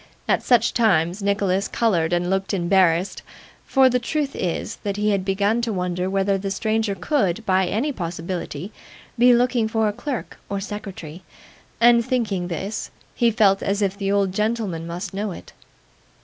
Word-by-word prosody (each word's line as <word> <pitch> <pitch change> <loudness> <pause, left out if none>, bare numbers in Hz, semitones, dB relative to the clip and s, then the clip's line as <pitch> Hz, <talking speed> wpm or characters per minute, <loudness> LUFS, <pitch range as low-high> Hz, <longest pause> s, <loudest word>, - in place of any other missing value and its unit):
At - - +2
such 235 -2 +3
times, 185 -4 +2
Nicholas 200 -1 +1
coloured 180 -8 +1
and 175 0 +1
looked 195 +2 0
embarrassed: 180 0 +2 0.5
for 265 -1 +5
the 250 0 +2
truth 285 +3 -2
is, 180 +5 -3
that 200 -1 -4
he 210 0 +1
had 195 -2 0
begun 200 +4 +1
to 235 -1 -1
wonder 180 -1 -2
whether 195 0 +1
the 195 +1 -3
stranger 215 +1 -1
could, 195 - 0
by 190 -1 +2
any 235 +11 0
possibility, 175 - -5 0.5
be 245 +1 +7
looking 240 -1 +2
for 220 0 +1
a 210 - -1
clerk 250 +3 -5
or 200 - -2
secretary; 195 -5 -7 0.6
and 235 0 +6
thinking 225 -8 -1
this, 190 +5 -4 0.2
he 235 - +3
felt 205 -4 +3
as 200 +1 0
if 195 -1 0
the 200 -1 -2
old 200 -2 +1
gentleman 210 -6 -1
must 175 +3 -5
know 205 +1 -2
it. - - -11
200 Hz, 165 wpm, -22 LUFS, 185-225 Hz, 0.6 s, be